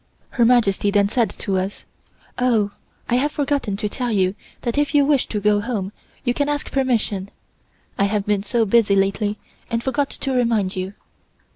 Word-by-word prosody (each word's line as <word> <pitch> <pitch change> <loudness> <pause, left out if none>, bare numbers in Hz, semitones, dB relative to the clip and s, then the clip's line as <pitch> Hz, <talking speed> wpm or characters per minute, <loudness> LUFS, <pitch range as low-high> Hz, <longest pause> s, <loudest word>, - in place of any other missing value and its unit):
Her 240 - +3
Majesty 220 -5 +3
then 200 0 +3
said 230 -2 +2
to 195 0 -2
us: 190 +2 -3 0.5
"Oh, 225 -5 +2 0.4
I 245 - +2
have 290 +4 +1
forgotten 280 -9 -1
to 210 0 -1
tell 245 +3 -3
you 190 -3 +2 0.3
that 235 - -2
if 290 0 +1
you 285 -1 +5
wish 280 -2 +2
to 210 - -2
go 210 0 +3
home, 205 -4 -3 0.3
you 245 - +1
can 285 +3 0
ask 290 -1 -2
permission. 225 -7 0 0.7
I 200 - +4
have 200 0 0
been 205 -1 +1
so 225 +3 +1
busy 210 -1 +4
lately, 200 +2 +1 0.3
and 230 0 -1
forgot 280 +1 0
to 270 - -3
remind 230 -6 +1
you." 185 +2 -4
220 Hz, 180 wpm, -21 LUFS, 200-250 Hz, 0.7 s, you